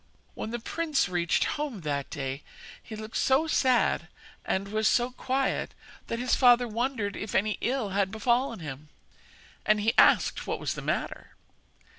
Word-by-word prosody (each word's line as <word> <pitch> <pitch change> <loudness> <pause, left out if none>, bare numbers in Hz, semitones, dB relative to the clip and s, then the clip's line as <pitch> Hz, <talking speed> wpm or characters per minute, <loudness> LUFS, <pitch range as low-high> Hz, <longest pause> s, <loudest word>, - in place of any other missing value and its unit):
When - - -5
the 240 - -3
prince 305 +4 0
reached 175 -1 +1
home 290 -9 -3
that 140 -3 -2
day 135 0 -4 0.4
he 220 - -9
looked 215 +1 -6
so 270 +4 +3
sad 255 - +2 0.4
and 195 +1 -2
was 215 +1 +1
so 245 +1 +2
quiet 265 +1 -1 0.3
that 230 - -2
his 250 +1 -1
father 245 -1 +5
wondered 230 -2 -2
if 210 - -5
any 210 0 +1
ill 245 -3 0
had 195 0 +1
befallen 235 +1 0
him, 150 0 -8 0.7
and 215 +1 +2
asked - - +4
what - - -2
was - - -2
the - - -6
matter. - - -3
220 Hz, 155 wpm, -28 LUFS, 195-255 Hz, 0.7 s, father